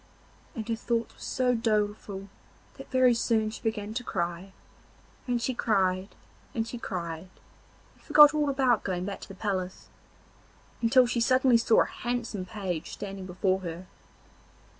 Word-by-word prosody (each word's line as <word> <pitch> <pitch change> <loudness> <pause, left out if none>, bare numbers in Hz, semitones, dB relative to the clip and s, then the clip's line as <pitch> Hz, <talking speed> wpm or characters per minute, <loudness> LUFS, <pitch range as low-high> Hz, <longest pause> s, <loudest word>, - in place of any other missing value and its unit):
And 225 -3 -5
her 230 - 0
thoughts 235 0 -2
were - - -23
so 255 -2 0
doleful 210 -3 -1 0.5
that - - -10
very 255 -2 +5
soon 225 -2 +1
she - - -9
began 215 -2 -2
to 245 +2 -3
cry, 175 -1 -3 0.8
and 245 -1 +1
she 255 +2 -1
cried, 190 -4 0 0.4
and 225 - 0 0.2
cried, 170 -2 -5 0.6
and - - -26
forgot 295 -1 +8
all 300 -1 +1
about 260 -5 +2
going 180 -2 -2
back 200 0 -5
to - - -9
the 195 - -10
palace, 190 -2 -3 0.9
until 245 +2 +5
she 240 -1 -1
suddenly 255 0 +4
saw 230 -1 +4
a - - -6
handsome 235 -5 -4
page 185 -5 -4
standing 195 -2 -6
before 185 +1 0
her. 175 0 -6
215 Hz, 150 wpm, -28 LUFS, 190-240 Hz, 0.9 s, forgot